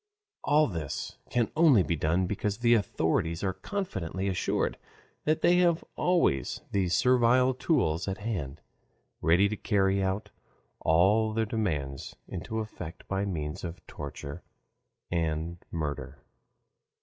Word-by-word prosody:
All 150 +1 +4
this 80 - -5
can 120 -2 +1
only 155 - +6
be 85 - 0
done 80 +5 +1
because 100 +1 -2
the 120 0 +4
authorities 85 -5 0
are 95 -1 0
confidently 95 - -3
assured 95 -2 0 0.5
that 155 +1 +2
they 175 +1 +5
have 175 -2 +3
always 170 - +1
these 95 -3 +1
servile 125 +1 +4
tools 95 - +1
at 95 0 -2
hand, 85 - -4 0.6
ready 85 +5 +4
to 105 - -3
carry 95 -2 +1 0.8
all 105 +7 +3
their 110 0 +1
demands 75 - -3
into 110 0 -4
effect 90 -6 -8
by 95 +1 -1
means 75 -6 -4
of 85 0 -7
torture 70 +2 -7 0.7
and 85 0 -1
murder. 75 -3 -4
95 Hz, 125 wpm, -29 LUFS, 80-115 Hz, 0.8 s, only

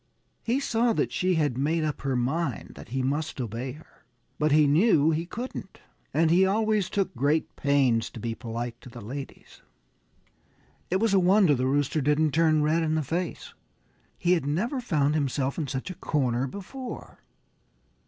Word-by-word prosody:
He 240 +4 0
saw 235 -3 +1
that - - 0
she 185 0 +1
had 145 -6 0
made 155 +3 +1
up 150 -2 -2
her 135 -1 -1
mind 135 +1 -1
that - - -12
he 130 +2 -2
must 145 +3 -2
obey 120 +2 -4
her. 155 +3 -17 0.4
But 150 0 +2
he 150 +1 +5
knew 155 0 +4
he 165 +2 -2
couldn't. 235 -3 -7 0.3
And 160 +2 +2
he 180 +3 +5
always 210 0 +1
took 195 -2 -1
great 145 +6 0
pains 135 -5 +2
to - - -10
be 115 +1 -3
polite 115 +1 -6
to - - -11
the 120 - -10
ladies. 130 +6 -9 1.3
It 185 - 0
was 225 -1 +2
a 195 - +5
wonder 185 -2 +5
the 130 -1 0
Rooster 145 +2 +1
didn't 150 +2 +2
turn 155 -1 +3
red 160 +2 +2
in 160 -1 0
the 155 - 0
face. 170 +5 -4 0.6
He 175 - +1
had 165 -6 +2
never 230 - -1
found 150 - +1
himself 140 -1 -1
in 150 - -2
such 135 +8 -4
a - - -8
corner 130 -5 0
before. 240 - -8
155 Hz, 175 wpm, -27 LUFS, 135-180 Hz, 1.3 s, he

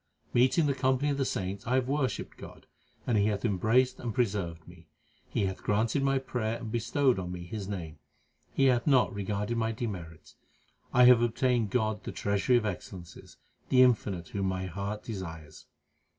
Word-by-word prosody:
Meeting 130 +7 +4
the 140 - +2
company 130 +1 +1
of 140 - -1
the 135 - +1
saints 95 -2 -3
I 125 - +2
have 130 -1 +1
worshipped 135 -4 -2
God, - - -12 0.4
and 115 -4 +2
He 100 - +3
hath 105 +1 -1
embraced 115 +5 +2
and 115 -3 -4
preserved 95 -8 -1
me. 85 -1 -15 0.4
He 100 - 0
hath 95 -1 -4
granted 110 +6 +1
my 135 0 +2
prayer 115 -4 -2
and 110 - -7
bestowed 120 +1 +1
on 90 -1 -5
me 90 -1 -6
His 100 +2 -6
name; 85 -6 -6 0.5
He 135 - +2
hath 125 -1 +3
not 130 -4 +4
regarded 105 +3 -2
my 115 0 0
demerits. 90 -8 -7 0.5
I 125 - +5
have 125 -1 +8
obtained 120 -1 +1
God 110 -2 -1
the - - -5
Treasury 100 +5 +1
of 115 - -1
excellences, 90 -2 -7 0.3
the 130 -1 +6
Infinite 100 -9 +1
whom 100 -1 -2
my 95 0 -2
heart 100 +3 -5
desired. 80 -8 -7
110 Hz, 180 wpm, -29 LUFS, 95-125 Hz, 0.5 s, have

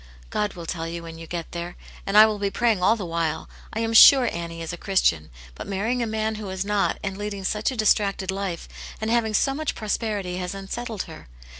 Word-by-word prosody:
" - - -22
God 210 -1 -1
will 170 -2 -7
tell 165 -1 -3
you 170 0 -5
when 165 0 -9
you 165 - -9
get 170 -1 -5
there. 170 +1 -5 0.3
And 200 +1 +2
I 215 - +11
will 215 -1 -1
be 200 -1 0
praying 225 -2 +1
all 220 +5 +4
the 205 -5 -5
while. 165 -2 -2 0.2
I 225 - -3
am 225 0 -1
sure 255 +2 +9
Annie 170 -1 -5
is 165 - -5
a - - -3
Christian, 165 - +1 0.2
but - - -8
marrying 215 +6 -1
a 235 - 0
man 220 0 -1
who 205 - -6
was 190 0 -3
not, 205 -1 +1
and 195 0 -4
leading 205 -1 -4
such 210 +3 0
a 260 - -5
distracted 200 -3 +2
life, 190 -3 -4 0.3
and 220 +1 -2
having 225 -2 +1
so 270 - +2
much 310 +2 -2
prosperity, 205 -4 -2
has 180 +1 -4
unsettled 210 +2 -5
her. 160 - -12
195 Hz, 235 wpm, -24 LUFS, 175-220 Hz, 0.3 s, I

